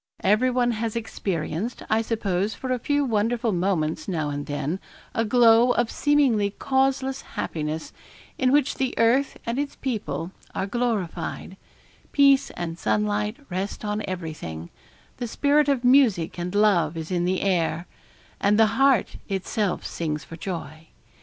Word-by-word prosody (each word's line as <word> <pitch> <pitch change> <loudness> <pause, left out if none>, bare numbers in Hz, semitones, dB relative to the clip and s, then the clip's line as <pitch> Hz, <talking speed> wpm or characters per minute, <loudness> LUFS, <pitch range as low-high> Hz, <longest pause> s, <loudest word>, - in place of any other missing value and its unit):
Everyone 245 +4 +3
has 225 0 -3
experienced, 195 -2 -3
I 220 +1 +2
suppose 210 -3 -1
for 255 - -4
a 250 - 0
few 285 +4 +1
wonderful 230 0 +1
moments, 170 -4 -1
now 155 -5 -1
and 145 0 -4
then, 145 +5 -2 0.3
a 225 - +1
glow 235 +1 +5
of 240 -1 0
seemingly 270 -9 +2
causeless 265 +4 0
happiness, 155 0 -4 0.4
in 255 -1 +2
which 285 -1 +3
the 260 -1 -1
earth 245 +5 +3
and 235 +3 -1
its 285 0 -3
people 215 -8 -3 0.2
are - - -1
glorified 215 -5 -2 0.6
peace 280 -1 +5
and 170 -1 -4
sunlight 105 -1 0
rest 195 +4 -3
on 210 0 -1
everything 155 - -6 0.5
the 245 - -3
spirit 290 +4 +2
of 270 -3 +1
music 240 - +4
and 180 +3 -4
love 205 -5 +3
is 160 +2 -5
in 175 -1 +1
the 185 +1 0
air, 170 -3 0 0.5
and 205 +1 +3
the 225 +3 +3
heart 270 -7 +3
itself 195 0 -1
sings 155 -2 -3
for 165 - -10
joy. 165 -3 -6
210 Hz, 145 wpm, -25 LUFS, 170-245 Hz, 0.6 s, glow